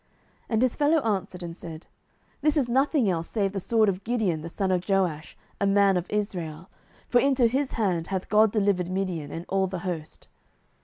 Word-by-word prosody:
07:007:014 -, -, -41 dB, 0.4 s
And 225 Hz, -1 st, +1 dB
his 255 Hz, -, +1 dB
fellow 300 Hz, +2 st, +3 dB
answered 190 Hz, -5 st, -2 dB
and 170 Hz, -1 st, -6 dB
said, 165 Hz, -2 st, -9 dB, 0.5 s
This 305 Hz, 0 st, +2 dB
is 270 Hz, -5 st, +2 dB
nothing 265 Hz, 0 st, +2 dB
else 170 Hz, -3 st, -1 dB
save 200 Hz, -3 st, 0 dB
the 195 Hz, -, -3 dB
sword 220 Hz, +3 st, +2 dB
of 190 Hz, -1 st, -1 dB
Gideon 215 Hz, -9 st, 0 dB
the 165 Hz, -, -6 dB
son 190 Hz, +2 st, -1 dB
of 180 Hz, +1 st, -1 dB
Joash, 175 Hz, -6 st, 0 dB, 0.2 s
a 200 Hz, -, +2 dB
man 195 Hz, -1 st, +4 dB
of 180 Hz, 0 st, -2 dB
Israel: 180 Hz, -5 st, -3 dB, 0.4 s
for 245 Hz, -, +4 dB
into 270 Hz, -3 st, +3 dB
his 265 Hz, +4 st, 0 dB
hand 180 Hz, -7 st, 0 dB
hath 190 Hz, -1 st, -3 dB
God 215 Hz, 0 st, +4 dB
delivered 195 Hz, -4 st, +1 dB
Midian, 185 Hz, -5 st, -2 dB
and 165 Hz, +1 st, -6 dB
all 190 Hz, 0 st, +1 dB
the 185 Hz, -2 st, -5 dB
host. 165 Hz, -4 st, -5 dB
195 Hz, 200 wpm, -26 LUFS, 175-225 Hz, 0.5 s, man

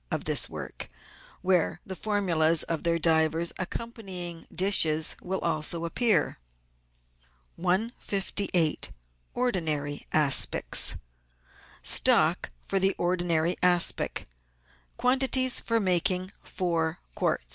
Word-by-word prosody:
of -, -, -3 dB
this -, -, +2 dB
work, -, -, -8 dB, 0.5 s
where 180 Hz, -2 st, 0 dB
the 190 Hz, -, -6 dB
formulas 170 Hz, -5 st, +2 dB
of 165 Hz, -2 st, -3 dB
their 170 Hz, -1 st, 0 dB
divers 160 Hz, +1 st, +2 dB
accompanying 185 Hz, -4 st, -6 dB
dishes 160 Hz, -4 st, +2 dB
will 190 Hz, +1 st, -3 dB
also 165 Hz, +1 st, 0 dB
appear. 205 Hz, -, +1 dB, 1.2 s
158— 190 Hz, -3 st, -1 dB, 0.5 s
ORDINARY 155 Hz, -12 st, -3 dB
ASPICS 150 Hz, -3 st, +3 dB, 0.9 s
Stock -, -, +2 dB, 0.2 s
for 195 Hz, -, 0 dB, 0.2 s
Ordinary 175 Hz, -1 st, -1 dB
Aspic. 175 Hz, -1 st, +2 dB, 0.4 s
— 60 Hz, 0 st, -35 dB
Quantities 260 Hz, 0 st, +3 dB
for 230 Hz, -1 st, -1 dB
making 185 Hz, -1 st, -1 dB
Four 165 Hz, -2 st, -3 dB, 0.2 s
Quart' -, -, -1 dB
175 Hz, 90 wpm, -26 LUFS, 160-195 Hz, 1.2 s, ASPICS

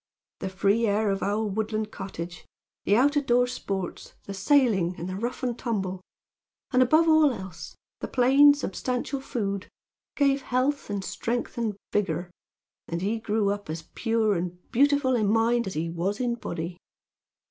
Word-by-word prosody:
"The -, -, -3 dB
free 200 Hz, +4 st, +2 dB
air 205 Hz, 0 st, +2 dB
of 195 Hz, -, -2 dB
our 210 Hz, +2 st, 0 dB
woodland 215 Hz, +1 st, -2 dB
cottage; 180 Hz, -3 st, -7 dB, 0.4 s
the 200 Hz, -, +4 dB
out 280 Hz, +6 st, +4 dB
of 285 Hz, -2 st, 0 dB
door 245 Hz, +1 st, +4 dB
sports; 195 Hz, -7 st, -5 dB
the 200 Hz, -, -7 dB
sailing; 195 Hz, -5 st, +3 dB
and 175 Hz, -, -5 dB
the 185 Hz, -, -4 dB
rough 240 Hz, +6 st, -4 dB
and 245 Hz, -2 st, 0 dB
tumble; 195 Hz, -7 st, -3 dB, 0.7 s
and, 255 Hz, -2 st, +4 dB
above 310 Hz, +6 st, +5 dB
all 315 Hz, -2 st, +6 dB
else, 180 Hz, -7 st, -8 dB, 0.2 s
the -, -, -4 dB
plain, 275 Hz, +3 st, +6 dB
substantial 255 Hz, +2 st, -3 dB
food, 200 Hz, -7 st, -3 dB, 0.5 s
gave 275 Hz, -1 st, +2 dB
health 260 Hz, +2 st, 0 dB
and 200 Hz, -1 st, -2 dB
strength 230 Hz, +7 st, -3 dB
and 225 Hz, -4 st, -1 dB, 0.2 s
vigor; 185 Hz, -3 st, -1 dB, 0.6 s
and 170 Hz, +1 st, -3 dB
he 220 Hz, +3 st, 0 dB
grew 210 Hz, -2 st, +1 dB
up 205 Hz, -4 st, -5 dB
as 160 Hz, +1 st, -4 dB
pure 225 Hz, -2 st, +1 dB
and 175 Hz, -1 st, -3 dB
beautiful 280 Hz, 0 st, +3 dB
in 215 Hz, -4 st, +1 dB
mind 225 Hz, +2 st, +2 dB
as 190 Hz, -, -5 dB
he 160 Hz, +2 st, -1 dB
was 175 Hz, +5 st, -2 dB
in 245 Hz, -1 st, 0 dB
body. 175 Hz, -6 st, -5 dB
215 Hz, 165 wpm, -26 LUFS, 190-250 Hz, 0.7 s, all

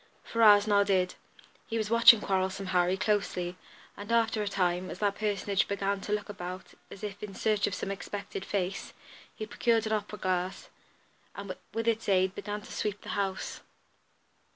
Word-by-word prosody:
Ferrars 210 Hz, -3 st, +6 dB
nodded. 200 Hz, -3 st, +3 dB, 0.5 s
He 230 Hz, -, -2 dB
was 215 Hz, -1 st, -2 dB
watching 230 Hz, -1 st, +8 dB
"Quarrelsome 190 Hz, 0 st, -1 dB
Harry" 180 Hz, +1 st, +3 dB
closely, 185 Hz, -3 st, 0 dB, 0.4 s
and 205 Hz, +2 st, -7 dB
after 225 Hz, -2 st, +2 dB
a 205 Hz, -, -2 dB
time, 180 Hz, -2 st, 0 dB
as -, -, -6 dB
that 205 Hz, 0 st, +1 dB
personage 200 Hz, -2 st, 0 dB
began 200 Hz, 0 st, -1 dB
to 205 Hz, -, -5 dB
look 210 Hz, 0 st, -1 dB
about 185 Hz, -2 st, -7 dB, 0.2 s
as 200 Hz, -, -11 dB
if 205 Hz, -1 st, -5 dB
in 200 Hz, -2 st, -7 dB
search 215 Hz, -2 st, +1 dB
of 190 Hz, -, -2 dB
some 195 Hz, -, -3 dB
expected 200 Hz, 0 st, -5 dB
face, 195 Hz, -1 st, -3 dB, 0.4 s
he 215 Hz, -, -5 dB
procured 230 Hz, 0 st, +1 dB
an 220 Hz, -, -1 dB
opera 210 Hz, 0 st, -2 dB
glass, 185 Hz, -1 st, -2 dB, 0.6 s
and 200 Hz, -2 st, -6 dB, 0.2 s
with 225 Hz, 0 st, -3 dB
its 225 Hz, -2 st, +1 dB
aid 190 Hz, -1 st, +3 dB
began 210 Hz, +1 st, -5 dB
to -, -, -12 dB
sweep 205 Hz, -1 st, -3 dB
the -, -, -10 dB
house. 195 Hz, -2 st, -2 dB
200 Hz, 170 wpm, -30 LUFS, 190-210 Hz, 0.6 s, watching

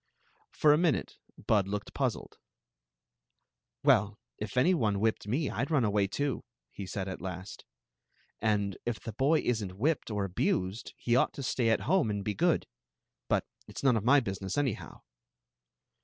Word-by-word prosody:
For 150 Hz, -1 st, +4 dB
a 150 Hz, -, +3 dB
minute 170 Hz, -5 st, 0 dB, 0.2 s
Bud 100 Hz, -3 st, +1 dB
looked 105 Hz, +1 st, -4 dB
puzzled. -, -, -2 dB, 0.7 s
" -, -, -56 dB
Well, 105 Hz, +1 st, +4 dB, 0.2 s
if 105 Hz, +3 st, -5 dB
any 170 Hz, +9 st, +5 dB
one 105 Hz, -, +1 dB
whipped 110 Hz, -1 st, 0 dB
me, 135 Hz, +7 st, 0 dB
I 115 Hz, -, -1 dB
'd 135 Hz, -, -3 dB
run 150 Hz, -6 st, +3 dB
away, 100 Hz, -1 st, +2 dB
too," 140 Hz, +6 st, -2 dB, 0.3 s
he 100 Hz, -, -7 dB
said 95 Hz, -1 st, -4 dB
at 95 Hz, -, -6 dB
last 95 Hz, +1 st, -7 dB, 0.4 s
" -, -, -40 dB
And 100 Hz, -2 st, -1 dB
if 120 Hz, -2 st, -2 dB
the 115 Hz, -, -7 dB
boy 145 Hz, +8 st, +3 dB
is 115 Hz, -3 st, 0 dB
n't 95 Hz, -1 st, -7 dB
whipped 145 Hz, +6 st, 0 dB
or 105 Hz, -2 st, -1 dB
abused 95 Hz, +2 st, -1 dB
he 120 Hz, -, +1 dB
ought 125 Hz, -, +3 dB
to 140 Hz, -, -6 dB
stay 120 Hz, -2 st, +1 dB
at 115 Hz, -, +2 dB
home 175 Hz, -, +2 dB
and 100 Hz, -1 st, -2 dB
be 105 Hz, -, 0 dB
good. -, -, +2 dB, 0.6 s
But -, -, +2 dB, 0.2 s
it -, -, -13 dB
*s -, -, -5 dB
none 130 Hz, -3 st, +5 dB
of 110 Hz, -, 0 dB
my 140 Hz, +5 st, +6 dB
business, 95 Hz, -3 st, -4 dB
anyhow. 135 Hz, -7 st, -2 dB
110 Hz, 185 wpm, -30 LUFS, 100-135 Hz, 0.7 s, my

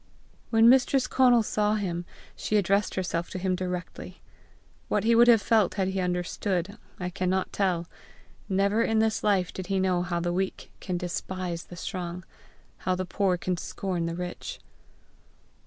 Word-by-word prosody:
When 225 Hz, 0 st, +5 dB
Mistress 260 Hz, +1 st, +5 dB
Conal 245 Hz, -3 st, +4 dB
saw 210 Hz, 0 st, +1 dB
him, 175 Hz, -4 st, -2 dB, 0.3 s
she 215 Hz, -, 0 dB
addressed 200 Hz, +1 st, +1 dB
herself 175 Hz, -2 st, -2 dB
to -, -, -5 dB
him 185 Hz, 0 st, 0 dB
directly. 180 Hz, -1 st, -5 dB, 0.7 s
What 205 Hz, -, 0 dB
he 230 Hz, +1 st, +4 dB
would 235 Hz, +1 st, +6 dB
have 230 Hz, -4 st, +6 dB
felt 220 Hz, -4 st, +3 dB
had 190 Hz, -2 st, 0 dB
he 190 Hz, 0 st, -2 dB
understood, 180 Hz, +2 st, -2 dB, 0.2 s
I 180 Hz, -1 st, -3 dB
cannot 185 Hz, +1 st, -1 dB
tell. 180 Hz, -4 st, 0 dB, 0.6 s
Never 200 Hz, +3 st, +2 dB
in 225 Hz, -1 st, +1 dB
this 220 Hz, 0 st, +1 dB
life 195 Hz, -4 st, +2 dB
did 185 Hz, -1 st, -6 dB
he 195 Hz, -1 st, 0 dB
know 185 Hz, -2 st, +2 dB
how 175 Hz, -1 st, -2 dB
the 175 Hz, 0 st, -1 dB
weak 190 Hz, +1 st, -3 dB
can 180 Hz, -2 st, -3 dB
despise 180 Hz, 0 st, -4 dB
the 175 Hz, -, -11 dB
strong, 175 Hz, 0 st, -5 dB, 0.5 s
how 185 Hz, -, -1 dB
the 185 Hz, +1 st, -3 dB
poor 185 Hz, 0 st, +1 dB
can 180 Hz, 0 st, -2 dB
scorn 175 Hz, -1 st, -3 dB
the 165 Hz, -, -3 dB
rich! 180 Hz, -, -6 dB
185 Hz, 165 wpm, -27 LUFS, 180-210 Hz, 0.7 s, would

